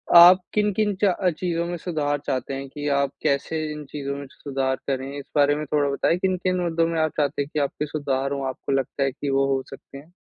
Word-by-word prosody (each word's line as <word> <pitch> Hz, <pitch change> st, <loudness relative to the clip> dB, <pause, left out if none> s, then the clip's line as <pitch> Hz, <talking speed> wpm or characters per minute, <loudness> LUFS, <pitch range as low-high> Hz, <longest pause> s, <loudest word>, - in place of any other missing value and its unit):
आप 175 Hz, +2 st, +10 dB
किन-किन 210 Hz, 0 st, +1 dB
च 195 Hz, -3 st, +5 dB, 0.3 s
चीज़ों 170 Hz, -2 st, -1 dB
में 175 Hz, +1 st, -3 dB
सुधार 150 Hz, -4 st, -1 dB
चाहते 130 Hz, +1 st, -2 dB
हैं 135 Hz, 0 st, -5 dB
कि 145 Hz, +2 st, -5 dB
आप 140 Hz, -1 st, 0 dB
कैसे 155 Hz, +2 st, 0 dB
इन 150 Hz, -1 st, -8 dB
चीज़ों 140 Hz, -1 st, -4 dB
में 140 Hz, -, -6 dB
सुधार 135 Hz, -2 st, -2 dB
करें? 135 Hz, 0 st, -2 dB
इस 140 Hz, -, -9 dB
बारे 145 Hz, 0 st, +4 dB
में 155 Hz, +1 st, -3 dB
थोड़ा 145 Hz, -1 st, +1 dB
बताइए, 140 Hz, +4 st, +1 dB
किन-किन 185 Hz, 0 st, 0 dB
मुद्दों 165 Hz, -1 st, +1 dB
में 165 Hz, -1 st, -1 dB
आप 155 Hz, -1 st, +1 dB
चाहते 145 Hz, -1 st, +1 dB
हैं 140 Hz, -, -4 dB
कि 155 Hz, -, 0 dB
आपके 145 Hz, +1 st, -1 dB
सुधार 140 Hz, -2 st, -2 dB
हो, 140 Hz, -1 st, -2 dB
आपको 130 Hz, -, -5 dB
लगता 135 Hz, +1 st, 0 dB
है 135 Hz, -, +1 dB
कि 140 Hz, +2 st, -4 dB
वो 135 Hz, 0 st, +3 dB
हो 135 Hz, -, -1 dB
सकते 135 Hz, 0 st, -11 dB
हैं? 150 Hz, +5 st, -14 dB
145 Hz, 230 wpm, -24 LUFS, 140-170 Hz, 0.3 s, आप